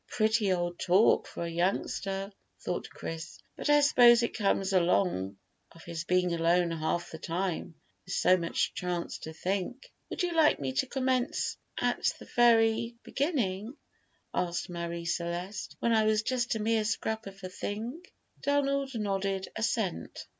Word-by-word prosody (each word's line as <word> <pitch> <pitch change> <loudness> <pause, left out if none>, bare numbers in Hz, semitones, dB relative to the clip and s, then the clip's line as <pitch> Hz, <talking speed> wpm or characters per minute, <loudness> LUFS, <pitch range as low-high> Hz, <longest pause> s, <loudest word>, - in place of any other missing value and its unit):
"Pretty 215 -2 +2
old 175 -1 -1
talk 185 +5 +4
for - - -6
a 170 - -4
youngster," 195 +3 -1 0.3
thought - - -4
Chris; 160 0 -7 0.2
"but - - -3
I 295 0 +6
suppose 240 -4 +7
it 235 - -2
comes 195 -2 +1
along 170 - +2 0.4
of 165 - -15
his 170 -1 -5
being 180 0 +2
alone 170 +1 +2
half 165 +1 -2
the 160 - -7
time, 170 -1 -3 0.3
with 180 - -4
so 180 +1 +5
much 170 -2 -1
chance 180 -1 -3
to 160 - -7
think." 195 - -3 0.2
"Would - - -2
you 350 -1 0
like 320 -2 +4
me 135 -2 -2
to 135 - 0
commence 260 +1 0 0.2
at - - +1
the - - -12
very 230 -1 +4
beginning," 245 - -1 0.6
asked 175 0 -2
Marie 170 0 -4
Celeste, 175 +3 -3
"when 235 - +2
I 220 -1 +4
was 215 0 +2
just 245 -1 0
a - - -2
mere 220 0 +2
scrap 220 +1 -2
of 195 0 -10
a 185 - -4
thing?" 225 - -5 0.4
Donald 275 -2 +1
nodded 195 -2 -1
assent. 220 -4 -2
195 Hz, 155 wpm, -30 LUFS, 175-235 Hz, 0.6 s, suppose